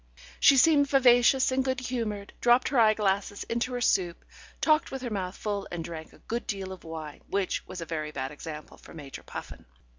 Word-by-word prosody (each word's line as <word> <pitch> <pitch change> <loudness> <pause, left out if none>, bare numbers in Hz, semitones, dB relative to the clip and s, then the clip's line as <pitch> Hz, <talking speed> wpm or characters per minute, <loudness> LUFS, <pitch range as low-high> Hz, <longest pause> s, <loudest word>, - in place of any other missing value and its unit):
She 275 - +7
seemed 285 0 +5
vivacious 260 -1 +5
and 260 0 +1
good 260 0 -1
humoured, 225 -5 -4
dropped 240 +1 +4
her 265 -2 +2
eyeglass 205 -2 +2
into 235 +2 -2
her 245 - -2
soup, 175 -6 +1 0.3
talked 310 +1 +3
with 270 -1 -6
her 240 - -4
mouth 190 -2 -3
full, 205 -2 -3
and 175 -2 -4
drank 160 -1 -8
a - - -18
good 235 +1 -5
deal 195 -2 -4
of 185 - -9
wine, 160 -2 -8
which 195 -1 -2
was 180 - -7
a - - -4
very 155 -2 -3
bad 135 -2 -4
example 150 +1 -9
for - - -14
Major 145 -4 -9
Puffin. - - -9
205 Hz, 200 wpm, -28 LUFS, 170-250 Hz, 0.3 s, She